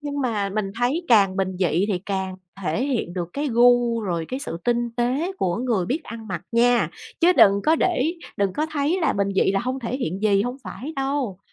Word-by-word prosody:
Nhưng 285 -1 -4
mà 215 -6 0
mình 195 -1 -2
thấy 265 +9 0
càng 200 -5 +5
bình 190 -1 -1
dị 180 +2 +1
thì 190 -4 0
càng 190 -1 -2 0.3
thể 185 +10 0
hiện 245 -10 -2
được 175 -2 -3
cái 290 0 -2
gu 240 -1 +4
rồi 175 -6 -2
cái 260 +2 -4
sự 170 - -5
tinh 240 0 +1
tế 265 +10 0
của 175 -2 0
người 230 -7 0
biết 280 +9 -1
ăn 225 -2 -9
mặc 175 -2 -4
nha, 240 +1 +3 0.3
chứ 345 +2 +6
đừng 200 - +7
có 320 +1 +5
để 335 -2 +1 0.2
đừng 200 -2 +1
có 305 - -1
thấy 300 +5 0
là 325 - +2
bình 200 0 0
dị 195 - +3
là 195 - +1
hông 255 +3 -3
thể 240 +2 -3
hiện 195 - -3
gì, 200 -2 +3
hông 245 +2 -3
phải 295 +6 -7
đâu. 270 -8 -2
235 Hz, 225 wpm, -23 LUFS, 195-270 Hz, 0.3 s, đừng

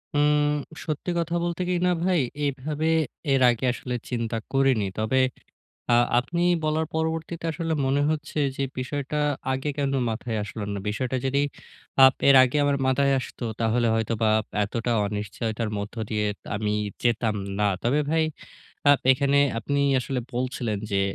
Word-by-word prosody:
উম 150 0 +3 0.3
সত্যি 155 +3 -3
কথা 170 0 -1
বলতে 175 +1 -2
কি - - +1
না 180 - +3
ভাই, 180 -1 +2 0.3
এভাবে 145 +3 -2 0.5
এর 135 - +3
আগে 120 +1 0
আসলে 125 0 -5
চিন্তা 115 -2 -2 0.2
করিনি। 135 -6 +3
তবে, 110 +5 +1 0.7
আ - - +5 0.3
আপনি 170 +7 -3 0.2
বলার 155 +1 +1
পরবর্তীতে 160 +1 -2
আসলে 165 +1 -2
মনে 135 +2 +2
হচ্ছে 150 -1 -2 0.2
যে 140 - 0 0.2
বিষয়টা 140 +3 -3 0.4
আগে 135 +3 -2
কেন 140 -1 0 0.2
মাথায় 110 0 -3
আসলো 105 +1 -6
না। 100 - -3
বিষয়টা 125 +5 -2
যদি 140 +1 +2 0.6
আ - - +11 0.2
এর 140 - +8
আগে 130 +3 0
আমার 140 -1 +2
মাথায় 140 +1 +3
আসত, - - -9 0.2
তাহলে 115 +1 +2
হয়তোবা 110 0 0 0.3
এতটা 115 +3 -2
অনিশ্চয়তার 105 +2 -3
মধ্য 100 +3 -5
দিয়ে 105 -1 0 0.3
আমি 105 0 -1 0.3
যেতাম 115 -2 +1 0.2
না। 105 - +3 0.2
তবে 130 +5 +2
ভাই, 160 0 +2 0.7
আপ 145 - +5
এখানে 140 +1 +2 0.2
আপনি 140 +4 -1 0.2
আসলে 130 0 -2
বলছিলেন 125 -4 -2
যে, 100 -1 +1
130 Hz, 150 wpm, -25 LUFS, 115-150 Hz, 0.7 s, আ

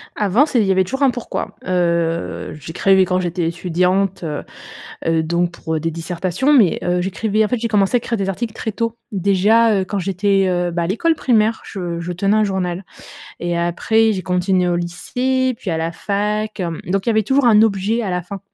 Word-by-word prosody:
Avant, 210 +7 +3
c'est 255 -6 0
il 210 - +3
y - - +3
avait 190 0 +3
toujours 265 +9 -3
un 265 - +5
pourquoi. 245 - -5
Heu, 170 -2 -1
j'écrivais 190 +5 +2
quand 180 0 0
j'étais 175 -1 -1
étudiante, 180 +2 0
heu 150 -2 -4 0.6
heu 165 -1 +2
donc 170 +2 0
pour 160 -2 -3
des 165 +1 -1
dissertations, 180 - -1
mais 220 - +4
heu, 180 0 0
j'écrivais 205 +4 0
en - - -1
fait, 250 - 0
j'ai 230 0 -2
commencé 210 +2 +2
à - - +4
écrire 230 0 -3
des 195 -1 -2
articles 220 +3 -3
très 220 - -4
tôt. 230 +1 -2
Déjà, 200 +2 +3
heu, - - -1
quand 200 +2 -3
j'étais, 195 +1 +1
heu, 175 -1 0
bah, 170 0 -2
à - - 0
l'école 320 - +1
primaire, 225 -5 +1
je 175 -4 -5
je 175 +1 -4
tenais 195 +4 +1
un 215 - +3
journal 185 -1 -2 0.6
et 175 0 -2
après, 220 +6 +2
j'ai 185 - -3
continué 180 0 +1
au 175 - +1
lycée, 255 +9 -1
puis 190 - -6
à 160 - -1
la 165 +1 -2
fac, 210 +3 -2
hem 170 -3 -3
donc 195 +2 -1
il - - +1
y - - +4
avait 220 -1 +2
toujours 265 +4 +2
un 215 -2 +6
objet 215 +2 +1
à 205 - -3
la 180 0 -1
fin 195 +3 -8
190 Hz, 215 wpm, -19 LUFS, 175-220 Hz, 0.6 s, un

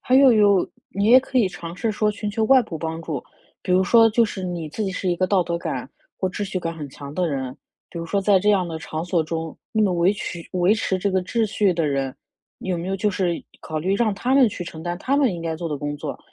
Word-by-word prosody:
还 255 - +1
有 265 -1 +7
有 205 -4 +4 0.2
你 200 +1 -2
也 255 +3 +8
可 260 - -6
以 235 -5 +5
尝 175 -2 -7
试 225 +2 -1
说 210 0 +1
寻 210 0 -4
求 220 +2 -1
外 260 +2 +6
部 165 - -7
帮 160 +1 -4
助。 155 -6 -4 0.4
比 - - -6
如 185 +1 +4
说 225 +2 +6
就 230 +1 +3
是 200 -3 -5
你 175 -3 -3
自 215 - -3
己 195 - -1
是 185 0 -2
一 - - +2
个 185 +2 +1
道 190 -1 +3
德 170 0 -2
感， - - -4 0.3
或 190 - -1
秩 185 +3 -3
序 195 -2 -2
感 165 -1 -4
很 150 -3 -7
强 140 +1 -9
的 180 0 0
人， 130 -3 -3 0.4
比 170 - -7
如 165 - -5
说 200 - 0
在 195 0 +4
这 205 +3 0
样 190 -3 +2
的 165 -1 -5
场 160 0 -5
所 175 -2 +1
中， 160 0 -4 0.2
那 220 - +2
么 200 -3 +3
维 175 +1 +3
持 180 - -5
维 185 +3 +3
持 195 -3 0
这 200 +2 -1
个 190 -1 +1
秩 225 +5 0
序 205 -3 +1
的 165 -2 0
人， 135 -2 -1 0.4
有 185 -2 -2
没 170 +2 -4
有 195 - -1
就 210 +2 +1
是 180 -3 0 0.3
考 155 - -4
虑 185 +5 0
让 215 -1 +1
他 250 +6 0
们 270 -3 +6
去 185 -3 -6
承 160 -2 -8
担 175 +1 -3
他 275 +8 +1
们 260 -9 +3
应 170 - -6
该 165 -1 -2
做 165 +1 -4
的 150 - -2
工 145 +1 -3
作， - - -5
185 Hz, 300 characters per minute, -23 LUFS, 165-210 Hz, 0.4 s, 也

